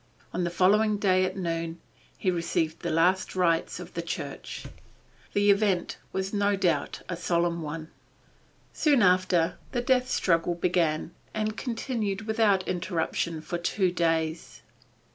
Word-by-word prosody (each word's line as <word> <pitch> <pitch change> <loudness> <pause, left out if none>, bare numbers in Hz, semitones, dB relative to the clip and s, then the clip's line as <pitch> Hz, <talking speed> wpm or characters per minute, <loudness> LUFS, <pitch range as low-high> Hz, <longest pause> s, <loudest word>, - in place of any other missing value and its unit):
On 180 - -1
the 175 - 0
following 205 +4 +3
day 185 -2 +3
at 185 +1 -4
noon, 165 -2 -3 0.4
he 185 - +1
received 165 -2 -1
the - - -3
last 180 +5 +2
rites 170 -3 +1
of - - -9
the - - -2
church. - - -6 0.7
The 205 0 +5
event 200 -3 +1
was 190 +1 -3
no 205 0 +2
doubt 190 -3 0
a 180 - -3
solemn 170 0 0
one. 155 +1 -5 0.8
Soon 285 -7 +3
after, 180 -2 +3
the 245 - +1
death 255 0 +2
struggle 170 -5 +1
began, 170 -2 0 0.2
and 215 0 -1
continued 225 -4 -3
without 215 -4 +2
interruption 170 -2 -1
for 175 +2 -4
two 185 +1 +1
days. 165 -2 -1
185 Hz, 140 wpm, -27 LUFS, 170-205 Hz, 0.8 s, The